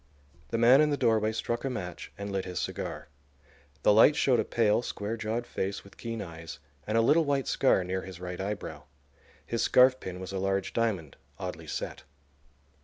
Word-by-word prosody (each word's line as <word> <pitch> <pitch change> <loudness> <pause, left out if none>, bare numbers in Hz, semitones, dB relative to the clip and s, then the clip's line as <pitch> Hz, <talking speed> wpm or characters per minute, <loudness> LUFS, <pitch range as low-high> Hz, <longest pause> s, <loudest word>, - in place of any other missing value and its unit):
The - - -1
man 120 +5 +7
in 155 - +3
the 145 - 0
doorway 110 -4 +2
struck 115 +1 -3
a 135 - -1
match 90 -9 -6
and 100 0 -5
lit 95 -1 -1
his 90 -1 -6
cigar. - - -4 0.8
The - - +6
light 115 +8 +7
showed 130 -5 +3
a - - +3
pale, 115 -1 +2
square 105 -2 -4
jawed 115 +2 -3
face 100 -3 -3
with 100 - -16
keen 115 -2 -4
eyes, 80 -4 -9 0.3
and 110 +1 +1
a - - +5
little 150 +8 +4
white 140 -3 0
scar 130 -8 +3
near 95 +1 -2
his 95 -2 -9
right 90 0 -5
eyebrow. 100 +1 -5 0.6
His 115 - -2
scarfpin 125 -8 +4
was 95 0 -6
a 95 - -2
large 95 0 -1
diamond, 100 -11 -1 0.2
oddly - - -6
set. - - -4
110 Hz, 185 wpm, -29 LUFS, 95-120 Hz, 0.8 s, man